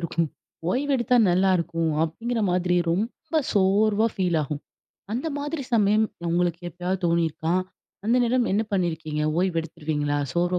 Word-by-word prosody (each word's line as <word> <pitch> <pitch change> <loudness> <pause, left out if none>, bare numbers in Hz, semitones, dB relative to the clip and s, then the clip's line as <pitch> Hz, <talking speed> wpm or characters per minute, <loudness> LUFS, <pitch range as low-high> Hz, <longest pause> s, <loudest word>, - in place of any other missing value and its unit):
இருக்கும். 170 -1 -1 0.4
ஓய்வு 280 +6 0
எடுத்தா 245 0 +2
நல்லாயிருக்கும், 175 -3 +2
அப்பிடீங்கிற 230 +9 -2
மாதிரி 180 0 +1
ரொம்ப 240 - -1
சோர்வா 205 +2 +3
ஃபீல் 180 -4 +1
ஆகும். 145 0 -4 0.5
அந்த 250 +8 -2
மாதிரி 290 +1 -3
சமயம் 215 0 +4 0.2
உங்களுக்கு 175 0 +1
எப்பயாவது 180 +2 -3
தோணிருக்கா? 165 0 0 0.5
அந்த 235 +2 +3
நேரம் 245 0 +2
என்ன 210 +3 +2
பண்ணியிருக்கீங்க? 160 -5 -1 0.2
ஓய்வு 180 -2 +1
எடுத்துருவீங்களா? 150 -3 -2
சோர்வா 175 +2 +1
180 Hz, 130 wpm, -25 LUFS, 165-220 Hz, 0.5 s, சமயம்